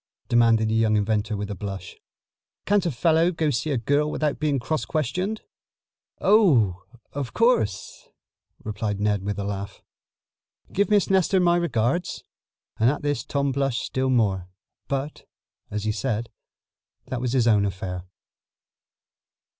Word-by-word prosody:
demanded 115 -2 +4
the - - 0
young 110 -1 +3
inventor 105 +1 0
with 105 0 -4
a - - -4
blush. 95 -2 -6 0.7
"Can't 200 -3 +2
a - - 0
fellow 165 +6 +3
go 160 -3 0
see 145 +4 -1
a 140 - +1
girl 145 +6 +1
without 150 -2 -1
being 150 -2 +1
cross 155 +5 -2
questioned?" 180 - -2 0.8
"Oh, 135 - +4 0.3
of 140 -4 -5
course," 225 - 0 0.5
replied 105 -1 -3
Ned 105 -1 +1
with 100 0 -3
a 100 - -2
laugh. 100 0 -5 0.9
"Give 200 +2 +1
Miss 205 -2 +3
Nestor 190 0 +3
my 175 -1 +4
regards," 165 -1 -1 0.6
and 115 +2 +5
at 145 - -2
this 145 -4 -1
Tom 140 -1 -1
blushed 135 -2 -1
still 130 0 -1
more. 100 -8 +1 0.4
But, 140 +2 -4 0.4
as 105 0 -3
he 110 - 0
said, 115 0 -2 0.8
that 125 -1 -3
was 125 -1 -1
his 125 -3 +3
own 105 -3 +4
affair. 90 -2 -4
125 Hz, 145 wpm, -24 LUFS, 105-155 Hz, 0.9 s, and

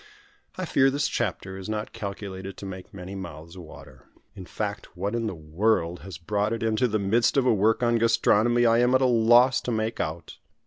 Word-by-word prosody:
I 185 - -3
fear 135 -4 +3
this 140 +1 0
chapter 95 0 -3
is 95 - -8
not 105 0 -4
calculated 95 -2 -7
to - - -8
make 95 -1 -8
many 95 0 -9
mouths 85 -3 -9
water. 75 -7 -13 0.3
In 95 -2 -10
fact 105 -3 -5
what 100 +4 -2
in 115 -1 -1
the 100 - -4
world 85 +2 0
has 95 -2 -9
brought 105 +6 -1
it 115 - -3
into 115 +3 +1
the 110 -2 0
midst 110 +6 +1
of 135 - +3
a 125 - +4
work 110 +4 +2
on 120 -1 +2
gastronomy 115 +1 +3
I 115 0 +4
am 125 +1 +3
at 130 - +3
a - - +4
loss 120 +1 +4
to 125 - -3
make 110 0 -2
out. 80 0 -5
105 Hz, 210 wpm, -25 LUFS, 95-115 Hz, 0.3 s, a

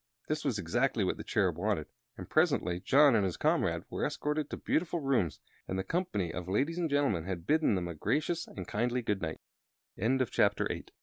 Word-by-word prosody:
That 155 0 -1
was 135 -7 0
exactly 85 -4 +1
what - - 0
the - - -6
Cherub - - +1
wanted, - - 0 0.3
and - - -7
presently 90 0 +2
John 140 +5 +5
and 105 - +3
his 95 -3 -1
comrade - - +1
were - - -2
escorted 150 0 -1
to - - -4
beautiful 170 +1 0
rooms, 130 - 0 0.3
and 95 - -2
the 95 - -1
company 100 - -1
of 90 -1 -5
ladies 145 - 0
and 165 -2 0
gentlemen 140 - +1
had 90 -3 -4
bidden 155 -3 +3
them 90 -2 -2
a 85 - -4
gracious 145 - -1
and 90 -3 -8
kindly 120 +3 0
good 100 -4 -1 0.8
n 120 +7 +2
120 Hz, 185 wpm, -31 LUFS, 95-150 Hz, 0.8 s, John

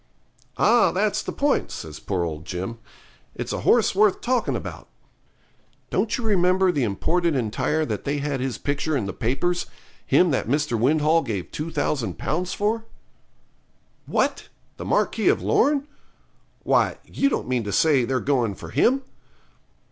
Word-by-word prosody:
'Ah, 240 0 +4
that's 210 +2 0
the - - -5
point,' 285 0 0
says 75 -2 -7
poor 95 -3 -2
old 80 -2 -4
Jim, 95 +8 -5 0.6
'it's - - -4
a - - -2
horse 235 -4 +3
worth 205 0 +3
talking 250 0 0
about. - - -6 1.0
Don't 220 - 0
you 245 - -5
remember 185 -3 +3
the 145 - -1
imported 165 - 0
entire 135 +6 0
that - - -4
they 145 +1 -1
had 145 -1 -2
his 130 -1 -2
picture 145 +1 -1
in 115 - -2
the 95 - -4
papers 170 +9 -1 0.4
him 180 -2 +3
that 130 - 0
Mr. 145 0 0
Windhall 150 +7 +3
gave 105 - -4
2000 150 -5 -2
Pounds 180 +1 -2
for?' 220 +2 -1 1.2
'What! - - 0 0.3
the - - -6
Marquis - - +1
of - - +3
Lorne? 285 0 +2 0.8
Why, - - +2
you 275 - +1
don't - - -2
mean 125 -2 0
to 100 - -3
say 145 +1 +3
they're 130 +2 0
going 125 -8 0
for - - -10
him?' 250 - +2
150 Hz, 155 wpm, -24 LUFS, 120-190 Hz, 1.2 s, Ah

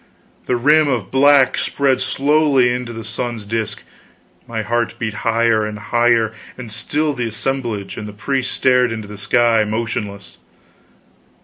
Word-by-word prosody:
The 125 - +1
rim 150 +5 +4
of 120 -8 -2
black 135 0 +4
spread 135 -2 +1
slowly 140 -1 +2
into 125 -1 -4
the 115 -1 -7
sun's 115 0 -4
disk, 110 +1 -3 0.6
my 110 -2 -3
heart 120 +1 -1
beat 110 -2 -3
higher 115 0 +1
and 105 0 -4
higher, 115 0 +1 0.2
and 120 -4 -8
still 145 +8 -1
the 125 -3 -3
assemblage 115 -2 -3
and 105 - -6
the - - -7
priest 130 +5 -2
stared 125 -2 +2
into 110 -2 -5
the 105 - -9
sky, 115 0 +3
motionless. 105 -3 -4
120 Hz, 145 wpm, -18 LUFS, 110-130 Hz, 0.6 s, rim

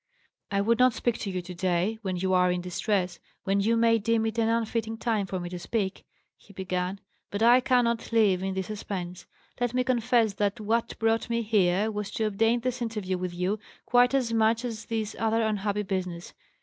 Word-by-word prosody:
"I 200 -1 +1
would 230 +3 +2
not 255 -1 +5
speak 240 -2 -1
to 200 - -3
you 185 -2 -3
to 180 +1 -8
day, 185 +4 0
when 190 -4 -2
you 185 +1 0
are 180 0 +4
in 180 - -1
distress, 180 0 -1 0.2
when 195 0 +1
you 230 +3 +2
may 230 0 +4
deem 225 +1 +1
it 225 +1 -2
an 225 0 +2
unfitting 225 -1 -1
time 220 -4 -1
for 185 - -3
me 175 - -5
to 180 0 -6
speak," 195 0 -3 0.3
he 200 - -19
began, 185 0 -3 0.3
"but 205 +2 -2
I 240 +2 +7
cannot 245 -3 +1
live 210 -5 +3
in 190 0 -2
this 190 -1 -2
suspense. 185 -3 -6 0.3
Let 245 0 -1
me 255 - +2
confess 240 -3 +2
that 205 +2 -1
what 225 +2 -1
brought 225 +1 +1
me 235 0 0
here 205 -1 +2
was 210 -1 -4
to 225 - -1
obtain 225 +3 +2
this 250 0 -2
interview 210 -6 -2
with 180 -1 -4
you, 185 +4 -1 0.3
quite 245 +2 +4
as 245 -4 0
much 225 +2 +2
as 225 -2 -5
this 220 -2 -3
other 225 0 +1
unhappy 210 -1 -1
business. 185 -3 -4
215 Hz, 205 wpm, -27 LUFS, 190-230 Hz, 0.3 s, I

